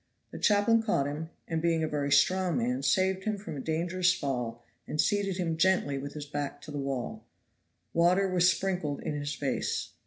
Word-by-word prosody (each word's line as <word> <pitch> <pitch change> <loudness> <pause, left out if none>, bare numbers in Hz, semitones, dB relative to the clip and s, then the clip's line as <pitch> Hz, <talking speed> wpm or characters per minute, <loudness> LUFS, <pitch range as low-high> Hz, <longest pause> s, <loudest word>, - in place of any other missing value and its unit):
The - - -7
chaplain 210 +2 +4
caught 205 -11 +1
him, 150 +3 -4 0.2
and 165 -1 -1
being 165 -1 +1
a - - +1
very 145 -2 -2
strong 180 +3 +3
man, 125 +2 0
saved 190 +7 +1
him 215 -1 0
from 200 -6 -7
a - - -5
dangerous 175 +4 +1
fall 125 -7 -3 0.2
and 150 - -4
seated 195 +2 +1
him 165 -3 -1
gently 165 -6 +2
with 140 +1 -6
his 150 -1 -5
back 145 -1 -4
to - - -9
the 145 - -4
wall. 135 -3 -3 0.7
Water 180 +4 +4
was 180 -1 +4
sprinkled 175 -5 -2
in - - -2
his 145 0 -3
face. 140 -2 -2
160 Hz, 190 wpm, -29 LUFS, 145-185 Hz, 0.7 s, chaplain